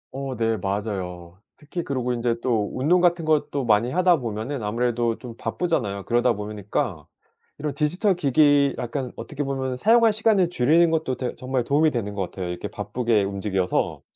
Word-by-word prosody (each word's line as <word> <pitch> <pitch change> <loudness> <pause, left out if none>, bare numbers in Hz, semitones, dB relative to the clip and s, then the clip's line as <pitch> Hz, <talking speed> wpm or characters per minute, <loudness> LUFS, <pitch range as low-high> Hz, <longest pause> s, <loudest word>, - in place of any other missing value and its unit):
어 135 -1 -4
네 115 -1 +1
맞아요. 95 -3 -4 0.2
특히 160 +3 -5
그리고 125 -4 -2
인제 120 -1 0
또 110 -5 +1
운동 165 +8 +2
같은 175 -2 +2
것도 150 -3 +1
많이 110 +1 +3
하다 180 +1 +4
보면은 115 +1 -4
아무래도 120 +1 0
좀 120 -3 -9
바쁘잖아요. 115 - -2
그러다 120 +3 +2
보니까 105 - -4 0.5
이런 145 -1 -3
디지털기기 150 - +3
약간 125 +1 -4
어떻게 145 +5 -5
보면은 135 -2 -2
사용할 225 - +4
시간을 210 -5 +2
줄이는 165 +3 +3
것도 160 -5 0
되 125 -1 -3
정말 130 -1 -2
도움이 150 +5 +3
되는 115 -7 -3
것 95 -3 -3
같아요. 90 -2 -5
이렇게 90 - -4
바쁘게 115 -4 0
움직여서 100 -2 -1
125 Hz, 380 characters per minute, -24 LUFS, 105-150 Hz, 0.5 s, 하다